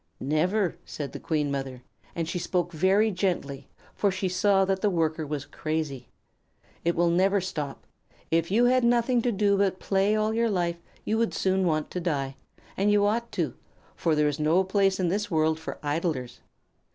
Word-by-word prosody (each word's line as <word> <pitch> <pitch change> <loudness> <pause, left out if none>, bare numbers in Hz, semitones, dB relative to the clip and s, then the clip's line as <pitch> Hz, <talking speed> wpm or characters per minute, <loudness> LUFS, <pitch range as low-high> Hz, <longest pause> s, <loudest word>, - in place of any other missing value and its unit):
"Never," 175 +6 0
said 145 -2 -6
the - - -7
Queen 150 -3 -1
Mother; 135 -2 -4 0.3
and 165 -1 -2
she 175 - -2
spoke 175 0 -1
very 190 +6 +3
gently, 155 -8 -2 0.3
for 205 - +1
she 190 0 -2
saw 195 +1 +3
that 190 0 -1
the 210 - +3
Worker 160 -3 0
was 145 -1 -4
crazy. 150 -3 -4 0.8
"It 170 0 +1
will 170 0 +3
never 195 +3 +3
stop. 155 -7 -5 0.5
If 165 0 +2
you 230 +5 +4
had 255 0 +3
nothing 240 +1 +3
to 245 - +1
do 200 -1 +2
but 190 -2 +1
play 195 +2 +1
all 215 0 +1
your 230 +1 +1
life 175 -3 -1 0.2
you 220 +1 0
would 230 - 0
soon 190 -1 +1
want 155 -2 -1
to 180 - -3
die, 140 -6 -2 0.4
and 200 +2 +1
you 205 0 +4
ought 235 +3 0
to, - - -1 0.4
for 165 -2 +1
there 150 0 +3
is 145 0 -2
no 160 +5 +3
place 195 0 +1
in 180 -2 +1
this 205 +3 -1
world 160 -2 +1
for 160 - -6
idlers. 145 -4 -2
180 Hz, 190 wpm, -27 LUFS, 155-200 Hz, 0.8 s, you